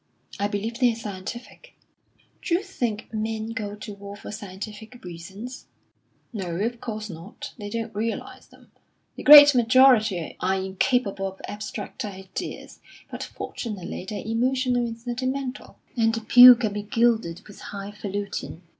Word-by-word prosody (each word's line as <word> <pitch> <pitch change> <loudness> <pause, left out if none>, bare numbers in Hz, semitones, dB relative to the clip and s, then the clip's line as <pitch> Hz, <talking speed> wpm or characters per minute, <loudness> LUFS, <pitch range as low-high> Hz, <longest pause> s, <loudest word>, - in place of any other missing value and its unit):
"I 200 - +1
believe 220 +3 -4
they're 245 -3 +3
scientific." 225 - -8 0.7
"D'you 355 +2 0
think 235 - -4
men 220 0 -3
go 210 -3 -4
to 210 0 -8
war 200 0 -9
for 205 - -9
scientific 215 +3 -9
reasons?" 190 +8 -9 0.7
"No, 185 -6 -4
of 230 +6 -2
course 215 -2 -5
not; 175 +1 -9
they 205 -1 -6
don't 230 +1 -4
realise 220 +2 -4
them. - - -21 0.4
The - - -8
great 290 0 +11
majority 235 - +4
are 190 +1 +1
incapable 195 +2 0
of 190 0 -9
abstract 210 0 -6
ideas, 190 -2 -7 0.3
but - - -6
fortunately 205 -7 -6
they're 210 - -5
emotional 245 +1 +1
and 230 0 -6
sentimental; 255 +3 -4 0.2
and 225 -1 +2
the 225 - -3
pill 245 +3 +10
can 225 -4 -2
be 210 - -3
gilded 220 -5 +1
with 205 - -13
high 200 0 -7
falutin. 200 -4 -5
220 Hz, 140 wpm, -25 LUFS, 200-240 Hz, 0.7 s, great